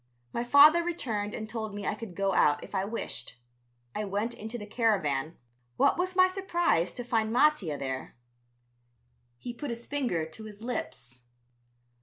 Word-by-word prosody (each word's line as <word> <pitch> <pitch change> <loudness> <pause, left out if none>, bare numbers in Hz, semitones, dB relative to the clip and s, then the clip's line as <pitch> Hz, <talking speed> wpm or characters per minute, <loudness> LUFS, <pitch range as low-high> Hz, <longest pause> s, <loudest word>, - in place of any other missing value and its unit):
My 235 - -1
father 295 +7 +7
returned 225 -12 -2
and 220 - -5
told 220 -2 -5
me 205 -1 -5
I - - 0
could 215 -6 -8
go 195 -1 +1
out 145 -4 +3
if - - -11
I 190 0 0
wished. 125 - -5 0.6
I 210 - -2
went 205 +4 -2
into 220 +2 -6
the 210 - -7
caravan. 170 - 0 0.4
What - - +4
was 365 +1 -2
my 370 0 +7
surprise 345 - +1
to 245 - -5
find 225 -2 0
Mattia 240 - +3
there. 130 -1 -5 1.2
He 240 - -6
put 285 +3 -6
his 235 0 -5
finger 245 - -1
to 190 +8 -11
his 215 0 -10
lips. 125 - -5
220 Hz, 165 wpm, -29 LUFS, 180-250 Hz, 1.2 s, father